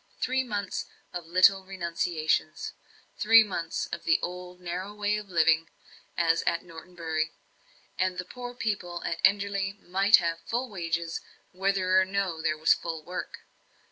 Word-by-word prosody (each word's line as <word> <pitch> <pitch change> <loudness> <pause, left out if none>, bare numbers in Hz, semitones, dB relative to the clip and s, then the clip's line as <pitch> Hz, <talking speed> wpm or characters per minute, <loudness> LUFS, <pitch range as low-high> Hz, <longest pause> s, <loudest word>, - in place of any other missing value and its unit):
Three 260 +1 +1
months 205 -5 -3 0.3
of 175 -2 -5
little 185 +2 +5
renunciations 170 -4 -1 0.5
three 225 +1 +8
months 170 -5 -3
of - - -5
the 165 - +4
old 180 0 -6
narrow 180 +3 -5
way 210 0 +1
of 210 -1 -6
living, 165 -2 +3 0.5
as 165 -1 +3
at 170 - +1
Norton 170 +1 -12
Bury 160 -2 -2 0.7
and 185 0 +1
the 180 - -3
poor 245 +4 -8
people 180 -7 -3
at 165 -1 -2
Enderley 200 -1 +2
might 195 +4 +5
have 170 -1 +1
full 240 +1 -3
wages, 165 -3 -2 0.3
whether 190 0 +2
or - - +2
no 190 -4 -2
there 155 -1 0
was 155 +1 +5
full 165 -2 -5
work. 180 +3 -6
180 Hz, 150 wpm, -28 LUFS, 170-200 Hz, 0.7 s, three